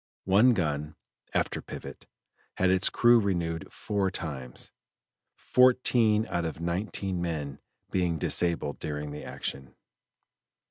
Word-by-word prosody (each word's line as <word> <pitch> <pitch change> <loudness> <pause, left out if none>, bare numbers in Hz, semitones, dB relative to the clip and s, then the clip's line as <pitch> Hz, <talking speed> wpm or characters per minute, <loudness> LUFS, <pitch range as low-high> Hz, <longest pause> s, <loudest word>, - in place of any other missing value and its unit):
One 110 +6 +5
gun 75 -4 -2 0.4
(after - - -1
pivot) - - -9 0.5
had 95 0 +2
its 95 +1 +4
crew 120 0 +5
renewed 85 -6 -2
four 100 -2 -1
times, 70 -9 -5 0.6
fourteen 120 -4 +3
out 85 -2 -1
of 80 -1 -4
nineteen 90 +1 -2
men 75 -5 -3 0.3
being 90 -3 +1
disabled 85 -3 0
during 75 -1 -4
the 75 - -7
action. 65 -2 -5
85 Hz, 110 wpm, -28 LUFS, 75-100 Hz, 0.6 s, One